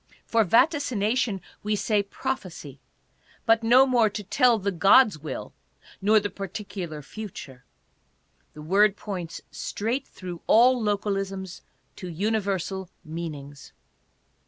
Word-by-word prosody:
For 230 Hz, -1 st, +3 dB
vaticination 235 Hz, -, +2 dB, 0.2 s
we 210 Hz, 0 st, 0 dB
say, 210 Hz, 0 st, +1 dB
prophecy, 195 Hz, -, -6 dB, 0.7 s
but 225 Hz, -1 st, +4 dB
no 245 Hz, +4 st, +6 dB
more 240 Hz, -4 st, +3 dB
to 210 Hz, +1 st, -6 dB
tell 235 Hz, +4 st, +3 dB
the 200 Hz, -1 st, -1 dB
god's 195 Hz, +2 st, +5 dB
will, 145 Hz, -2 st, -6 dB, 0.5 s
nor 215 Hz, +2 st, +5 dB
the 205 Hz, -1 st, -4 dB
particu 195 Hz, -2 st, -6 dB
lar 150 Hz, -1 st, -8 dB
future. 135 Hz, -10 st, -9 dB, 0.9 s
The 150 Hz, -, -9 dB
word 200 Hz, +5 st, +3 dB
points 180 Hz, -5 st, -6 dB
straight 230 Hz, +6 st, -3 dB
through 180 Hz, -3 st, -8 dB
all 245 Hz, +2 st, +5 dB
localisms 195 Hz, -3 st, -2 dB, 0.4 s
to 185 Hz, -, -7 dB
universal 190 Hz, 0 st, -2 dB, 0.2 s
meanings. 150 Hz, -3 st, -7 dB
200 Hz, 115 wpm, -26 LUFS, 175-225 Hz, 0.9 s, no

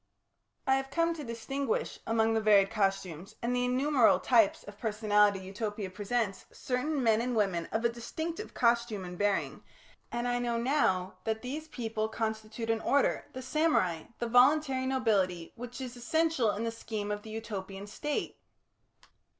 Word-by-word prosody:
I 265 Hz, 0 st, +4 dB
have 270 Hz, 0 st, -4 dB
come 335 Hz, +3 st, +1 dB
to 315 Hz, -3 st, -7 dB
distinguish 245 Hz, +2 st, -3 dB
among 225 Hz, 0 st, +2 dB
the 225 Hz, -, +1 dB
varied 205 Hz, -2 st, +5 dB
costumes 195 Hz, -2 st, -1 dB
and 240 Hz, +1 st, -1 dB
the 245 Hz, 0 st, +1 dB
innumerable 255 Hz, 0 st, +4 dB
types 225 Hz, -5 st, +3 dB
of 205 Hz, 0 st, -12 dB
personality 210 Hz, -2 st, +3 dB
Utopia 205 Hz, 0 st, -4 dB
presents, 205 Hz, +1 st, -2 dB
certain 265 Hz, +3 st, -2 dB
men 225 Hz, -1 st, +4 dB
and 245 Hz, 0 st, -1 dB
women 190 Hz, -6 st, +1 dB
of 225 Hz, +2 st, -1 dB
a -, -, +5 dB
distinctive 320 Hz, -, -5 dB
costume 235 Hz, -4 st, +1 dB
and 180 Hz, 0 st, -7 dB
bearing, 205 Hz, +1 st, 0 dB, 0.5 s
and 240 Hz, +1 st, -2 dB
I 245 Hz, 0 st, +1 dB
know 240 Hz, -1 st, -1 dB
now 230 Hz, -8 st, +1 dB
that 220 Hz, +1 st, -2 dB
these 300 Hz, +5 st, -5 dB
people 225 Hz, -6 st, -3 dB
constitute 220 Hz, 0 st, -3 dB
an 225 Hz, -1 st, -1 dB
order, 280 Hz, 0 st, +2 dB
the 260 Hz, -, -6 dB
samurai, 255 Hz, -, +1 dB
the 240 Hz, -, -2 dB
"voluntary 260 Hz, +2 st, +4 dB
nobility," 200 Hz, -10 st, +1 dB
which 245 Hz, +2 st, -8 dB
is 255 Hz, -2 st, -6 dB
essential 315 Hz, 0 st, +1 dB
in 210 Hz, +2 st, -2 dB
the 230 Hz, -, -1 dB
scheme 215 Hz, -2 st, -4 dB
of 205 Hz, 0 st, -3 dB
the 220 Hz, -, -11 dB
Utopian 200 Hz, -3 st, -6 dB
State. 295 Hz, +8 st, -3 dB
230 Hz, 160 wpm, -30 LUFS, 205-255 Hz, 0.5 s, varied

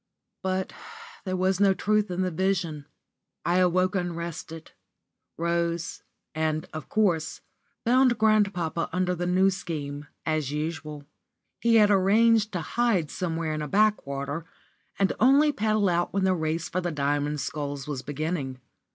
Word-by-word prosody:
*_ -, -, -56 dB, 0.4 s
But 190 Hz, 0 st, -2 dB, 0.5 s
there 185 Hz, -1 st, -1 dB
was 185 Hz, +1 st, +1 dB
no 195 Hz, -1 st, +4 dB
truth 210 Hz, +1 st, +1 dB
in 180 Hz, +1 st, -1 dB
the 185 Hz, -, -1 dB
vision. 170 Hz, -4 st, -1 dB, 0.6 s
I 175 Hz, +1 st, +2 dB
awoke 185 Hz, +1 st, +3 dB
unrested 170 Hz, -3 st, -4 dB, 0.7 s
rose, 170 Hz, 0 st, -1 dB, 0.3 s
and, 155 Hz, 0 st, -1 dB
of 155 Hz, -1 st, -7 dB
course, 175 Hz, -7 st, +1 dB, 0.4 s
found 250 Hz, +1 st, +4 dB
grandpapa 200 Hz, -7 st, +1 dB
under 180 Hz, +1 st, 0 dB
the 175 Hz, 0 st, -2 dB
New 190 Hz, +2 st, +4 dB
Scheme, 145 Hz, -6 st, -5 dB, 0.2 s
as 155 Hz, -3 st, 0 dB
usual. 150 Hz, -1 st, -4 dB, 0.5 s
He 235 Hz, -1 st, +3 dB
had 210 Hz, -2 st, +6 dB
arranged 215 Hz, +3 st, +4 dB
to 175 Hz, -, -1 dB
hide 190 Hz, -4 st, 0 dB
somewhere 165 Hz, -3 st, -2 dB
in 155 Hz, -, -3 dB
a 150 Hz, -, -3 dB
backwater, 150 Hz, -6 st, 0 dB, 0.5 s
and 195 Hz, -1 st, +2 dB
only 280 Hz, +4 st, +5 dB
paddle 215 Hz, -4 st, +1 dB
out 175 Hz, -1 st, 0 dB
when 195 Hz, -1 st, +1 dB
the 190 Hz, 0 st, +3 dB
race 160 Hz, -1 st, -1 dB
for 185 Hz, -, -2 dB
the 175 Hz, -, -1 dB
Diamond 145 Hz, 0 st, 0 dB
Sculls 145 Hz, -2 st, -4 dB
was 140 Hz, -3 st, -3 dB
beginning. 145 Hz, -1 st, -3 dB
175 Hz, 145 wpm, -26 LUFS, 155-195 Hz, 0.7 s, had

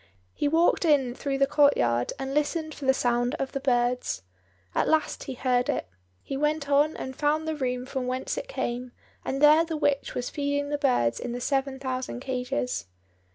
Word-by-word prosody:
He -, -, 0 dB
walked 330 Hz, +5 st, +3 dB
in 280 Hz, -7 st, +3 dB
through 275 Hz, +1 st, -2 dB
the 275 Hz, -, +4 dB
courtyard, 270 Hz, -, +3 dB
and 270 Hz, -1 st, -4 dB
listened 310 Hz, +2 st, 0 dB
for 285 Hz, -, -8 dB
the 265 Hz, -, +6 dB
sound 245 Hz, +2 st, +1 dB
of 270 Hz, -3 st, -3 dB
the 275 Hz, -, -2 dB
birds. 245 Hz, -, 0 dB, 0.5 s
At -, -, +1 dB
last 315 Hz, -1 st, +1 dB
he 265 Hz, -, -5 dB
heard 250 Hz, 0 st, +1 dB
it. -, -, -1 dB, 0.4 s
He 275 Hz, -, -5 dB
went 300 Hz, +1 st, 0 dB
on 290 Hz, +2 st, +3 dB
and 260 Hz, 0 st, -6 dB
found 305 Hz, +3 st, +1 dB
the 315 Hz, -, -1 dB
room 250 Hz, -3 st, -2 dB
from 260 Hz, -1 st, -3 dB
whence 255 Hz, +1 st, -2 dB
it -, -, -5 dB
came, 250 Hz, -, -3 dB, 0.3 s
and 275 Hz, +2 st, -2 dB
there 305 Hz, +2 st, +7 dB
the 325 Hz, -1 st, -3 dB
witch 285 Hz, -2 st, 0 dB
was 245 Hz, -, -3 dB
feeding 285 Hz, 0 st, -1 dB
the 290 Hz, 0 st, -1 dB
birds 120 Hz, -, +2 dB
in 245 Hz, -, -4 dB
the 245 Hz, -, -3 dB
seven 270 Hz, +1 st, -1 dB
thousand 255 Hz, -2 st, -4 dB
cages. 255 Hz, -, -2 dB
275 Hz, 195 wpm, -27 LUFS, 250-295 Hz, 0.5 s, there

